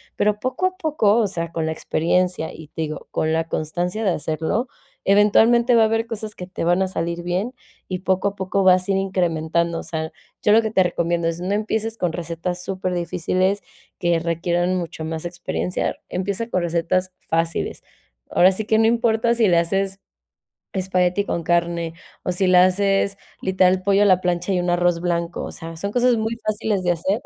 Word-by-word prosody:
pero 210 0 +1
poco 260 +10 0
a 370 0 -6
poco, 300 - +2
o 225 -3 +3
sea, 170 -3 -4
con 165 -1 -2
la 160 - -1
experiencia 180 +1 0
y, 160 -2 -11
te 160 - -6
digo, 155 -1 -6
con 160 0 0
la 165 0 -1
constancia 175 +7 -2
de 190 - +3
hacerlo 165 - -2 0.4
eventualmente 225 +4 +5
va 230 -1 +6
a - - +5
haber 225 +1 +1
cosas 220 -2 -6
que 180 - -7
te 180 - -4
van 175 +2 +3
a 190 - +1
salir 170 -1 -3
bien 185 +8 -2 0.3
y 185 -1 -3
poco 190 +1 +1
a 200 - -3
poco 190 +1 -1
vas 185 0 +4
a - - +4
ir 195 - +2
incrementando, 170 -3 0
o - - -7
sea, 160 0 -4 0.3
yo 210 - +3
lo 225 +2 +6
que 220 - -2
te 190 -3 +3
recomiendo 170 -1 0
es 165 0 -4
no 185 +3 -2
empieces 220 +1 -1
con 180 -2 0
recetas 175 +1 -4
súper 185 -1 -3
difíciles 180 +3 0 0.4
que 170 -1 +2
requieran 170 +2 0
mucho 170 -3 -4
más 160 0 -4
experiencia, 175 +1 -3
empieza 200 +5 -2
con 185 - 0
recetas 175 +2 0 0.2
fáciles, 165 0 -1 0.5
ahora 185 +2 +5
sí 205 +3 -3
que 220 +1 +2
no 225 - +4
importa 230 0 +2
si 230 -3 +3
le 175 - +4
haces, 195 +3 -1 0.7
espagueti 185 0 +1
con 170 - -2
carne 170 -1 0 0.3
o - - -2
si 185 +1 +1
le 180 0 +6
haces 195 +2 +3 0.2
literal 185 0 +3
pollo 200 +1 +3
a - - +6
la 185 -2 +5
plancha 180 +1 0
y 180 - +1
un 175 0 0
arroz 175 -1 +2
blanco, 170 -1 -2
o - - -5
sea, 165 0 -8
son 200 +5 -3
cosas 245 +2 +3
muy 225 +1 -2
fáciles 210 -3 -1
de 175 - +3
hacer, 190 +6 -1
185 Hz, 200 wpm, -22 LUFS, 170-205 Hz, 0.7 s, va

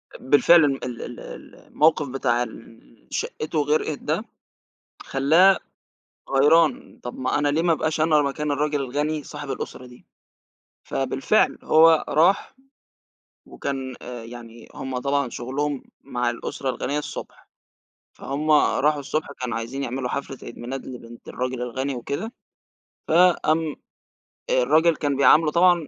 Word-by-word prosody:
آآ - - -7
بالفعل 165 +4 +7
م - - -1
ال 125 -2 -5
ال 120 - -7 0.4
الموقف 155 -1 +1
بتاع 125 -2 0
اللي 115 -1 -14
شقِّته 155 +1 -3
غرقت 150 0 0
ده - - -2 0.8
خلّاه 165 +8 +4 0.7
غيران، 150 +4 +3
طَب 120 - -7
ما 130 +2 0
أنا 145 0 +1
ليه 150 +3 +1
ما 170 -1 +3
أبقاش 160 0 -1
أنا 155 -1 +4
مكان 145 +2 -2
الراجل 145 0 0
الغني 145 +3 -2
صاحب 145 0 -8
الأسرة 125 - -6
دي؟ 125 0 -16 0.8
فبالفعل - - +1
هو 160 0 +5
راح 170 - +2 0.9
وكان 135 -2 -5
آآ 120 -2 -8
يعني 115 0 -11
هم 130 -1 -5
طبعًا 140 0 0
شُغلهم 135 +4 -3 0.2
مع 125 -3 -1
الأسرة 125 +3 -4
الغنية 130 +3 -2
الصبح، - - -8 0.7
فهُم 150 +3 -4
راحوا 150 0 +3
الصبح 150 +3 -2
كانوا 125 -2 -3
عايزين 120 +5 -5
يعملوا 130 0 -3
حفلة 135 0 -4
عيد - - -9
ميلاد 125 +3 -6
لبنت 120 -2 -11
الراجل 125 0 -3
الغني 130 +3 -3
وكده، 140 - -4 0.8
فقام 160 -2 +3 0.7
آآ 125 - +3
الراجل 160 +5 +4
كان 145 -2 -1
بيعامله 150 +3 +5
طبعًا 175 -1 +4
140 Hz, 135 wpm, -23 LUFS, 125-155 Hz, 0.9 s, بالفعل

